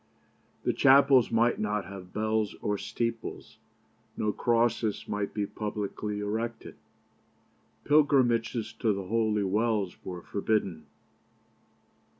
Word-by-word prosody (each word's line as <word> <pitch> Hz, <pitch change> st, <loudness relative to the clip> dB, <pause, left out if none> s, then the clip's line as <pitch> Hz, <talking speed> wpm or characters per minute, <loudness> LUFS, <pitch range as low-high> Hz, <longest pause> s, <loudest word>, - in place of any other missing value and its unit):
The -, -, +1 dB
chapels 135 Hz, -2 st, +6 dB
might 115 Hz, +1 st, +2 dB
not 105 Hz, -1 st, -1 dB
have 95 Hz, -2 st, -10 dB
bells 110 Hz, -1 st, -1 dB
or 105 Hz, -, 0 dB
steeples. 115 Hz, +2 st, -4 dB, 0.6 s
No 105 Hz, -, 0 dB
crosses 115 Hz, -2 st, 0 dB
might 105 Hz, -1 st, -2 dB
be 105 Hz, -1 st, -2 dB
publicly 105 Hz, 0 st, -4 dB
erected. 110 Hz, +3 st, -4 dB, 1.1 s
Pilgrimages 120 Hz, -6 st, +2 dB
to 110 Hz, -3 st, +2 dB
the 100 Hz, 0 st, -4 dB
holy 110 Hz, 0 st, +1 dB
wells 105 Hz, -1 st, 0 dB
were 90 Hz, -2 st, -7 dB
forbidden. 100 Hz, -7 st, -1 dB
110 Hz, 105 wpm, -28 LUFS, 105-115 Hz, 1.1 s, chapels